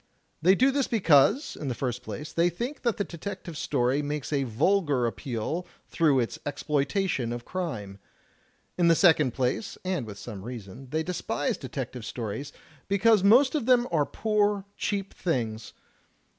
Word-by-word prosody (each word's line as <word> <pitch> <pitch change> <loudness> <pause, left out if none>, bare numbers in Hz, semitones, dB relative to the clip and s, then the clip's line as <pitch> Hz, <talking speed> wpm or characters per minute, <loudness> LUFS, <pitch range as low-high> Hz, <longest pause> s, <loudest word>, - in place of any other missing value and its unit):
They 185 +4 +6
do 260 +6 +4
this 275 -1 0
because, 190 - +4
in 145 - -6
the 125 - -2
first 125 -1 -3
place, 150 - -7
they 170 +1 +3
think 240 - -5
that 235 -3 0
the 205 - 0
detective 170 -1 -7
story 130 0 +1
makes 150 0 -3
a 140 -2 +1
vulgar 145 - +2
appeal 120 - -3 0.2
through 150 -6 +3
its 115 - -4
exploitation 145 - -1
of 120 0 -5
crime. 110 - -4 0.8
In 175 - +4
the 165 - +6
second 155 - +4
place, 130 - -1
and 180 -11 -1
with 100 -2 -8
some 105 -4 -8
reason, 120 +2 -9
they 155 +3 -1
despise 165 -4 -2
detective 130 -2 -6
stories 115 +3 -5 0.4
because 200 +1 +4
most 245 +7 +6
of 285 -7 -1
them 250 -1 +4
are 150 -4 +2
poor, 210 -2 +1
cheap 200 -2 -2
things. 115 -9 -2
150 Hz, 155 wpm, -27 LUFS, 125-195 Hz, 0.8 s, They